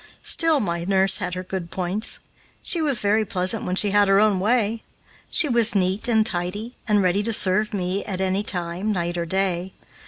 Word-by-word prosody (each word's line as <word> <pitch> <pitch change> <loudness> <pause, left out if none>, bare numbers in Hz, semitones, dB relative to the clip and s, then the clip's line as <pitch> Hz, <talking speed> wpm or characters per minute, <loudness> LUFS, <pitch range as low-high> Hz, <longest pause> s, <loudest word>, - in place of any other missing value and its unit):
Still 325 -3 +3
my 170 -6 -3
nurse 190 +1 +2
had 180 -2 -4
her 185 - -5
good 185 -2 -6
points. 185 +5 -3 0.5
She 340 - +3
was 285 -7 +2
very 210 +2 +2
pleasant 185 -3 0
when 180 - -2
she 205 +1 +1
had 205 0 +3
her 195 0 +4
own 210 -3 +2
way. 220 +1 0 0.5
She 305 - +4
was 235 -4 +3
neat 190 +3 0
and 220 -2 +2
tidy, 205 +6 -3
and 210 -2 +2
ready 185 +2 +1
to 230 +2 -2
serve 210 0 +1
me 190 0 -3
at 190 -2 -4
any 190 +1 0
time, 180 +1 -1
night 175 -3 -2
or 170 -1 -3
day. 190 0 -2
195 Hz, 195 wpm, -22 LUFS, 180-215 Hz, 0.5 s, her